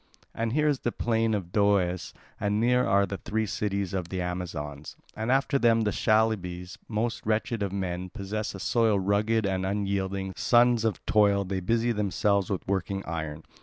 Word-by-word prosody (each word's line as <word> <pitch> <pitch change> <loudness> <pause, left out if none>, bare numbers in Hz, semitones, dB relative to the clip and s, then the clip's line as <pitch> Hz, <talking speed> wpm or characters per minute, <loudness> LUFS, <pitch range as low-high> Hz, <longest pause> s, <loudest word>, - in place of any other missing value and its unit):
And 115 0 -2
here 150 +1 +2
is 145 -3 +1
the 120 - -1
plain 115 -2 +1
of 90 -4 -4
Doeas, 100 -4 +1 0.3
and 105 +1 0
near 125 +2 +3
are 100 +1 +4
the 100 0 -5
three 110 0 -1
cities 100 -2 -2
of 90 -3 -3
the 95 - -3
Amazons, 85 -5 -5 0.2
and 110 +3 -1
after 135 +1 +2
them 115 -2 +4
the 105 -2 +1
Chalybes, 95 -5 0
most 115 +2 -2
wretched 110 +1 -1
of 100 -2 -1
men, 95 -2 -3
possess 105 +3 -4
a - - -7
soil 110 0 +2
rugged 105 +3 +1
and 95 -1 -1
unyielding 95 -1 -2
sons 120 -1 +4
of 110 - -2
toil, 100 -2 +3
they 95 0 -2
busy 115 +6 +1
themselves 100 -2 +1
with 95 - -3
working 95 0 -2
iron. 80 -2 -4
100 Hz, 175 wpm, -27 LUFS, 95-110 Hz, 0.3 s, are